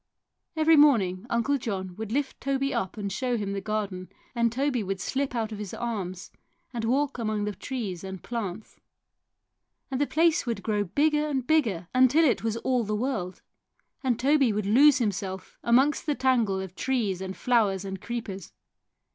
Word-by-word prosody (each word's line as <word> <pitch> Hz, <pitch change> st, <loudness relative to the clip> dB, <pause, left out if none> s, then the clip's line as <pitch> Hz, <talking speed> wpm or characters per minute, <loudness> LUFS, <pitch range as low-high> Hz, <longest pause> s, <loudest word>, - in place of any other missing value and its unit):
Every 315 Hz, 0 st, +5 dB
morning 220 Hz, -9 st, +4 dB
Uncle 270 Hz, +5 st, +1 dB
John 190 Hz, -6 st, -4 dB
would 220 Hz, +1 st, -6 dB
lift 275 Hz, +2 st, -2 dB
Toby 275 Hz, 0 st, 0 dB
up 225 Hz, -4 st, -2 dB
and 200 Hz, -2 st, -3 dB
show 245 Hz, +4 st, -1 dB
him 200 Hz, -2 st, -3 dB
the 195 Hz, -, -3 dB
garden, 200 Hz, -3 st, -3 dB, 0.2 s
and 235 Hz, -2 st, +2 dB
Toby 260 Hz, 0 st, 0 dB
would 195 Hz, -1 st, -3 dB
slip 265 Hz, +8 st, -2 dB
out 225 Hz, -1 st, -1 dB
of 210 Hz, -, -6 dB
his 210 Hz, -3 st, -6 dB
arms 195 Hz, -6 st, -4 dB, 0.4 s
and 235 Hz, -2 st, -3 dB
walk 270 Hz, +3 st, 0 dB
among 215 Hz, -2 st, -1 dB
the 210 Hz, 0 st, -2 dB
trees 200 Hz, -5 st, -5 dB
and 190 Hz, -2 st, -7 dB
plants. 220 Hz, -4 st, -5 dB, 1.1 s
And 265 Hz, +1 st, -1 dB
the 290 Hz, -, +2 dB
place 325 Hz, 0 st, +3 dB
would 230 Hz, -4 st, -2 dB
grow 210 Hz, -2 st, 0 dB
bigger 300 Hz, -, +2 dB
and 265 Hz, -4 st, -1 dB
bigger 230 Hz, -, +1 dB
until 260 Hz, +5 st, +5 dB
it 250 Hz, -6 st, +2 dB
was 225 Hz, 0 st, -1 dB
all 250 Hz, 0 st, 0 dB
the 215 Hz, 0 st, -2 dB
world, 210 Hz, -6 st, -3 dB, 0.6 s
and 245 Hz, -3 st, +1 dB
Toby 275 Hz, -2 st, +3 dB
would 210 Hz, -1 st, -2 dB
lose 270 Hz, +8 st, +6 dB
himself 195 Hz, -5 st, -3 dB
amongst 265 Hz, +7 st, +3 dB
the 295 Hz, -, +1 dB
tangle 235 Hz, -8 st, +2 dB
of 190 Hz, -2 st, -6 dB
trees 215 Hz, -7 st, -1 dB
and 190 Hz, 0 st, -5 dB
flowers 205 Hz, -6 st, +2 dB
and 190 Hz, -1 st, -6 dB
creepers. 215 Hz, -6 st, -6 dB
230 Hz, 175 wpm, -27 LUFS, 195-265 Hz, 1.1 s, lose